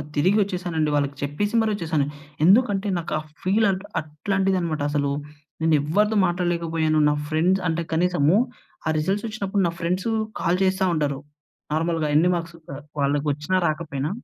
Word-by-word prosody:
తిరిగొచ్చేశానండి. 180 -2 +1
వాళ్ళకి 140 -1 0
చెప్పేసి 175 +10 -2
మరీ 220 -1 +1
ఒచ్చేసాను. 160 -6 0 0.4
ఎందుకంటే, 205 0 +4
నాకు 170 - -4
ఆ - - -5 0.2
ఫీల్ 205 +4 +3
అట్ 190 0 -4 0.2
అట్లాంటిదనమాట 170 +1 -1
అసలు. 145 -1 0 0.5
నేనెవ్వరితో 160 +8 +2
మాట్లాడలేకపోయాను. 170 -3 0
నా - - +2 0.2
ఫ్రెండ్స్ 175 +5 +2
అంటే, 165 +1 0
కనీసము 175 0 +3 0.5
ఆ - - +2
రిసల్సొచ్చినప్పుడు 200 +3 -1
నా - - -1
ఫ్రెండ్సు 180 +5 -1 0.3
కాల్ 180 +2 +1
చేస్తా 190 0 +1
ఉంటారు 145 -3 -1 0.5
నార్మల్‌గా, 160 0 0
ఎన్ని 170 +3 +4
మార్క్స్ 170 0 -5 0.2
ఆహ్, 140 +2 -8 0.2
వాళ్ళకొచ్చినా, 145 +4 0
రాకపోయినా. 150 -2 -2
170 Hz, 130 wpm, -24 LUFS, 155-190 Hz, 0.5 s, ఎందుకంటే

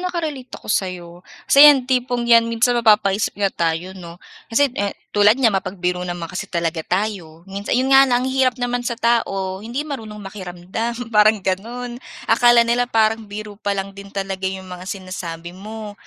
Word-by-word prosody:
naka-relate 305 -8 -5
ako - - -15
sa'yo. 180 -3 -2 0.3
Kasi 290 +2 +8
'yan 270 -4 +5
tipong 250 -2 0
'yan 230 -1 +5
minsan 230 +2 +2
mapapaisip 210 -2 +2
nga 200 -2 0
tayo 170 +2 -2
'no. 170 -3 -11 0.3
Kasi, 265 +3 +2
e,h 205 -5 -3 0.2
tulad 210 +3 +5
niyan, 235 -5 +3
mapagbiro 185 -2 -2
naman 175 -1 -4
kasi 185 - -5
talaga 170 -1 -2
tayo. 175 -3 -3
Minsan 200 +3 -3
'yon 260 +2 +1
nga 270 0 +7
lang 245 +1 +1
ang - - -1
hirap 260 -2 +2
naman 245 0 -2
sa 240 -1 -3
tao, 195 -5 0
hindi 240 +7 -4
marunong 225 -8 -7
makiramdam, 210 +5 -5
parang 210 -1 +4
gano'n. 240 +6 -4 0.2
Akala 240 +1 +5
nila 240 +1 +1
parang 220 -1 +1
biro 210 +1 -7
pa 200 -1 -1
lang 195 0 -4
din 200 0 -11
talaga 195 -1 -3
'yong 190 0 -6
mga 180 0 -9
sinasabi 175 -3 -6
mo, 210 +3 -8
210 Hz, 175 wpm, -20 LUFS, 190-240 Hz, 0.3 s, Kasi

